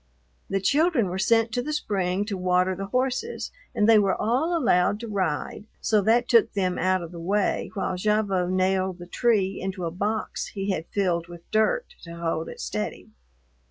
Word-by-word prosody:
The 195 - 0
children 280 - +2
were 185 +2 -3
sent 225 +3 +3
to 245 +1 0
the 300 - -4
spring 195 -8 -1
to 205 -1 -3
water 185 0 +1
the 195 +2 -5
horses 260 - -2 0.2
and 210 - +3
they 225 -1 +7
were 195 -2 +1
all 275 +10 +1
allowed 205 - +2
to 235 - -5
ride, 195 -2 -2
so 215 -2 +2
that 235 +4 +3
took 230 -2 +4
them 185 -3 0
out 185 -1 +1
of 170 - -8
the 170 - -8
way 195 +4 0
while 190 -2 -1
Gavotte 195 -2 +1
nailed 185 0 +1
the 175 - -9
tree 200 -1 +1
into 190 -1 -3
a 165 - -2
box 210 +5 -2
he 195 0 -3
had 165 -3 -3
filled 175 -4 0
with 175 -1 -11
dirt 345 - +1
to 170 -1 -9
hold 165 -1 -2
it - - -10
steady. 60 -2 -4
195 Hz, 190 wpm, -25 LUFS, 180-225 Hz, 0.2 s, they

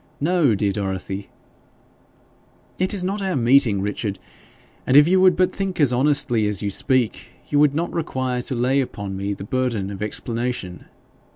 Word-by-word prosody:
No, 155 - +2
dear 100 0 0
Dorothy 95 0 -4 0.7
' - - -34
'It 185 +1 0
is 195 -3 -2
not 195 +3 -2
our 190 -2 -1
meeting, 120 -5 +3
Richard; 105 0 -3 0.7
and 130 - +5
if 145 +1 +7
you 185 +1 +3
would 185 -1 +5
but 185 - +2
think 195 -2 -4
as 140 -5 +3
honestly 125 -5 +2
as 105 0 -3
you 100 - -1
speak, 125 +2 0 0.2
you 145 - +2
would 145 -1 +4
not 170 +2 -2
require 130 -6 -2
to 130 - -4
lay 130 +3 +2
upon 100 -6 -5
me 100 +1 -3
the - - -9
burden 115 -4 -2
of 100 0 -8
explanation. 115 -3 -4
125 Hz, 175 wpm, -22 LUFS, 100-150 Hz, 0.7 s, if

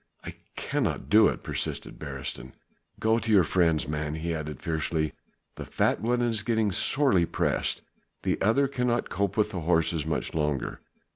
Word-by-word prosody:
I - - -6 0.2
cannot - - -2
do 110 0 +7
it," - - -3
persisted - - -3
Beresteyn. 65 +2 -6 0.5
"Go 110 +1 +2
to 115 -1 -2
your 100 -4 +6
friends, 80 -4 +2
man," 75 0 -2
he 85 +2 -2
added 75 -3 -5
fiercely, 80 -1 -1 0.4
"the - - -5
fat - - 0
one 120 +2 +1
is 115 -3 0
getting 110 -1 +1
sorely 100 - +3
pressed, 85 - -1 0.4
the - - 0
other 135 +7 +3
cannot 125 -3 -1
cope 100 0 -1
with 105 -1 +2
the 95 - -3
horses 80 -1 +1
much 80 +1 -2
longer! 75 -4 -2
90 Hz, 160 wpm, -27 LUFS, 80-110 Hz, 0.5 s, do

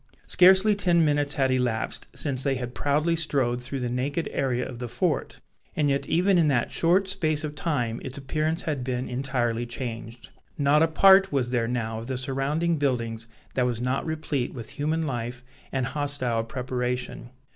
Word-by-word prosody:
Scarcely 190 +3 +6
ten 175 -5 +3
minutes 145 -1 +1
had 135 -2 +2
elapsed 125 -3 -1
since 135 -4 -2
they 135 0 +1
had 125 -1 -5
proudly 150 +5 +1
strode 135 -7 0
through 130 +2 -4
the 125 - -1
naked 140 +6 -1
area 125 -2 -1
of 120 -2 -8
the 125 - -4
fort, 160 +4 -2 0.3
and 145 -2 +2
yet 140 - -1
even 180 +2 +3
in 160 - +4
that 125 -5 +1
short 185 +4 +3
space 160 -5 0
of 150 -1 -4
time 140 -7 -1
its 130 +1 -6
appearance 155 +5 -1
had 145 -5 -2
been 125 0 -2
entirely 120 -2 -1
changed. 115 -1 -6 0.3
Not 145 +1 +4
a 165 - +5
part 190 +4 +6
was 130 -4 0
there 120 -2 +1
now 115 -2 -2
of 115 - -8
the 130 -1 -2
surrounding 140 +6 0
buildings 120 -5 -1 0.3
that 125 -1 +1
was 120 -2 -2
not 125 +2 -1
replete 155 -6 -2
with 115 -3 -8
human 155 +3 -1
life 120 -2 -4 0.3
and 135 -2 0
hostile 130 -4 -1
preparation. 125 0 -3
135 Hz, 180 wpm, -26 LUFS, 125-155 Hz, 0.3 s, Scarcely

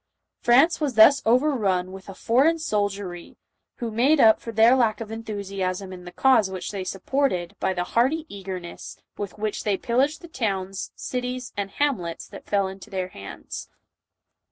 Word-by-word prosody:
France 275 +8 +4
was 280 -5 -1
thus 250 +6 +7
overrun 225 -8 +2
with 190 0 -10
a 195 - -8
foreign 275 +8 +3
soldiery 205 - -3 0.4
who 235 -3 -4
made 265 +8 +3
up 220 -4 +6
for 230 - -6
their 225 +3 +6
lack 225 -4 +2
of 225 -1 -7
enthusiasm 195 -4 -4
in 180 -1 -10
the 175 - -8
cause 255 -5 +4
which 190 -1 -5
they 195 -2 -4
supported, 190 -1 -1
by 190 - +1
the 180 -1 -1
hearty 265 - +1
eager 195 -5 -6
ness 175 -1 -9 0.2
with 205 -1 -6
which 210 0 -3
they 205 -3 +1
pillaged 270 +9 0
the 345 - -10
towns, 195 - -3
cities 250 0 -4
and 200 -1 -3
hamlets, 195 - -2
that - - -12
fell 200 -2 +1
into 190 +3 -10
their 185 -2 -3
hands. 100 - -9
215 Hz, 170 wpm, -24 LUFS, 190-250 Hz, 0.4 s, thus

